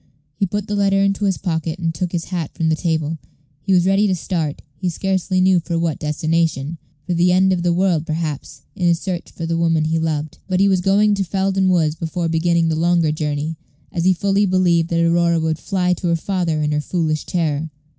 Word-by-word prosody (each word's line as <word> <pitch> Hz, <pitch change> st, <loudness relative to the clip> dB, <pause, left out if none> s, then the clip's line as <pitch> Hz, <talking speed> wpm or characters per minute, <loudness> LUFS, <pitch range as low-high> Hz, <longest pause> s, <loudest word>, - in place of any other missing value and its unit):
He 195 Hz, +7 st, -1 dB
put 205 Hz, +2 st, -3 dB
the 210 Hz, -, -4 dB
letter 195 Hz, -1 st, +2 dB
into 195 Hz, +1 st, +1 dB
his 190 Hz, -3 st, +1 dB
pocket, 160 Hz, -3 st, -2 dB
and 165 Hz, -2 st, -2 dB
took 175 Hz, +2 st, -3 dB
his 170 Hz, -2 st, -2 dB
hat 175 Hz, -5 st, -4 dB
from 160 Hz, -1 st, 0 dB
the 160 Hz, -, +2 dB
table. 160 Hz, -1 st, -1 dB, 0.4 s
He 195 Hz, -, -2 dB
was 180 Hz, -2 st, +4 dB
ready 195 Hz, +2 st, +3 dB
to 190 Hz, -, +1 dB
start 165 Hz, -4 st, -3 dB
he 180 Hz, +5 st, -2 dB
scarcely 190 Hz, +1 st, -1 dB
knew 185 Hz, -1 st, +4 dB
for 170 Hz, 0 st, -3 dB
what 165 Hz, -3 st, -1 dB
destination; 155 Hz, 0 st, -1 dB, 0.3 s
for 180 Hz, -, -1 dB
the 175 Hz, +1 st, +3 dB
end 190 Hz, +1 st, +4 dB
of 180 Hz, -, -1 dB
the 175 Hz, 0 st, +1 dB
world, 170 Hz, -3 st, +1 dB
perhaps 155 Hz, -2 st, -4 dB
in 180 Hz, -, 0 dB
his 170 Hz, -1 st, +3 dB
search 180 Hz, -2 st, -4 dB
for 165 Hz, -, -6 dB
the 165 Hz, 0 st, -1 dB
woman 165 Hz, -2 st, +2 dB
he 160 Hz, +1 st, 0 dB
loved. 155 Hz, -2 st, -3 dB
But 185 Hz, -1 st, 0 dB
he 200 Hz, -, +4 dB
was 190 Hz, -2 st, +2 dB
going 205 Hz, +3 st, +3 dB
to 200 Hz, -1 st, 0 dB
Felden 190 Hz, +1 st, 0 dB
Woods 165 Hz, -4 st, +2 dB
before 165 Hz, +1 st, -3 dB
beginning 165 Hz, +1 st, +2 dB
the 160 Hz, -, 0 dB
longer 170 Hz, -1 st, +2 dB
journey, 150 Hz, +1 st, -3 dB, 0.3 s
as 170 Hz, -, -2 dB
he 185 Hz, -, +5 dB
fully 200 Hz, +2 st, +1 dB
believed 175 Hz, -3 st, +2 dB
that 170 Hz, 0 st, +2 dB
Aurora 170 Hz, 0 st, +2 dB
would 160 Hz, 0 st, -1 dB
fly 180 Hz, -1 st, 0 dB
to 180 Hz, -, -3 dB
her 170 Hz, -, +2 dB
father 165 Hz, -3 st, -1 dB
in 150 Hz, -, 0 dB
her 150 Hz, 0 st, 0 dB
foolish 155 Hz, -2 st, -2 dB
terror. 160 Hz, -3 st, -1 dB
170 Hz, 225 wpm, -20 LUFS, 160-185 Hz, 0.4 s, he